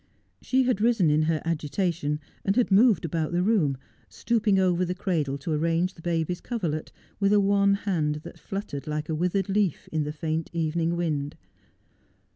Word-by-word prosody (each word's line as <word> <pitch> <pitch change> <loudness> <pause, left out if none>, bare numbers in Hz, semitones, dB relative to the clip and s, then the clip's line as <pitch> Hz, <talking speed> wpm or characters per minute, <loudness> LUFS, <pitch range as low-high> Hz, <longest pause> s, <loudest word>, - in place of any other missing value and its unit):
She 260 0 +2
had 250 -5 0
risen 220 -9 +3
in 150 +1 +3
her 160 -2 0
agitation 160 -1 -1 0.2
and 195 - +1
had 245 -4 +2
moved 205 -2 +5
about 165 0 -2
the 175 +1 +2
room, 180 -11 +2 0.3
stooping 220 -4 +1
over 185 -1 +2
the 180 0 -2
cradle 160 -8 -1
to 140 +4 -5
arrange 165 +4 +1
the 165 - -15
baby's 170 +1 -1
coverlet, 170 -11 -3 0.3
with 200 -1 +2
a 210 - +5
wan 200 0 +3
hand 155 -7 -1
that - - -11
fluttered 195 -9 -6
like 150 0 -3
a - - 0
withered 180 +4 0
leaf 195 -4 0
in 155 - 0
the 150 - -3
faint 160 +1 -3
evening 165 +1 0
wind. 150 -4 -2
170 Hz, 175 wpm, -26 LUFS, 155-200 Hz, 0.3 s, moved